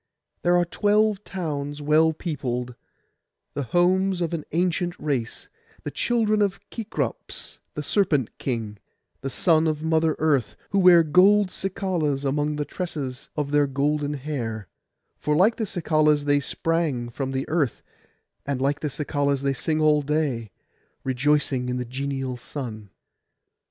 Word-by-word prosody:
There 175 0 +4
are 175 - +3
twelve 210 +2 +2
towns 145 -7 -4
well 155 +2 +4
peopled, 125 -7 -3 0.8
the - - -2
homes 180 +7 +2
of 170 -1 -1
an 160 -3 -3
ancient 175 +1 0
race, 135 -7 -2 0.4
the - - -4
children 220 -3 +1
of 200 -2 +1
Kekrops 225 -2 -4 0.2
the - - -3
serpent 150 - +1
king, 110 -5 -3 0.4
the 135 - -3
son 160 +4 +3
of 155 -1 -1
Mother 160 -1 +2
Earth, 145 -7 +1 0.2
who 200 - +2
wear 180 -2 +7
gold 185 +5 +5
cicalas 175 -8 -1
among 145 +2 0
the 150 0 -2
tresses 145 -6 -5
of 145 -2 -2
their 145 -1 +4
golden 145 +2 0
hair; 120 -8 -4 0.5
for 150 - 0
like 200 +8 +4
the 220 - -2
cicalas 155 -4 +2
they 145 0 +3
sprang 150 -5 -1
from 135 +2 -4
the 135 0 -2
earth, 150 -7 0 0.6
and 140 -2 -2
like 140 +2 +1
the 150 - -2
cicalas 140 -1 -1
they 140 0 +1
sing 155 +4 -1
all 150 -1 +4
day, 140 -6 -1 0.5
rejoicing 135 -1 +1
in 125 - -1
the 125 - -3
genial 135 0 -3
sun. 115 -5 -7
150 Hz, 145 wpm, -25 LUFS, 135-175 Hz, 0.8 s, wear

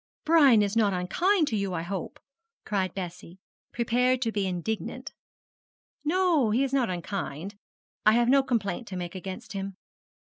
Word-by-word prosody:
'Brian 280 -9 +6
is 200 +1 -1
not 210 -3 +3
unkind 320 - +1
to 225 - -1
you, 200 -3 -1
I 165 - -2
hope?' 185 0 -5 0.5
cried 190 -4 -1
Bessie, 180 -1 -7 0.3
prepared 245 +2 +1
to 225 - 0
be 205 -3 -1
indignant. 185 +4 -4 0.9
'No, 330 -6 +2
he 235 +6 +2
is 275 -1 -2
not 260 -5 +2
unkind. 180 -1 -4 0.5
I 215 - +6
have 235 +1 +3
no 275 +2 +5
complaint 235 -3 -2
to 190 - -6
make 175 -1 -5
against 190 +1 -7
him.' 195 -1 -5
210 Hz, 155 wpm, -27 LUFS, 185-255 Hz, 0.9 s, Brian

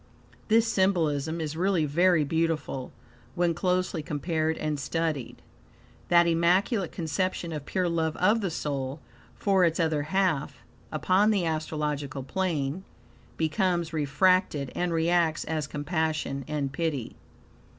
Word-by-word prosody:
This 225 +1 +4
symbolism 165 -7 +1
is 155 -1 -3
really 180 -2 +1
very 170 +2 +3
beautiful 160 -4 -1 0.4
when 175 -1 +2
closely 180 -1 0
compared 155 +2 -1
and 150 -1 -2
studied. 155 -3 -3 0.6
That 170 0 +5
immaculate 175 +4 +2
conception 170 +1 -2
of 150 -2 -6
pure 185 -1 0
love 165 -2 -1
of 210 +5 +3
the 195 - -1
soul 140 -3 -3 0.4
for 195 -2 +2
its 170 0 +2
other 160 -3 +1
half, 150 -6 -1 0.3
upon 185 +7 +3
the 200 -5 +2
astrological 150 -3 -2
plane, 165 0 -2 0.5
becomes 165 +1 0
refracted 150 -1 +2
and 175 0 -1
reacts 165 -1 +2
as 155 -2 -2
compassion 155 -3 -2
and 145 -3 -2
pity. 145 -7 -2
160 Hz, 120 wpm, -27 LUFS, 150-180 Hz, 0.6 s, That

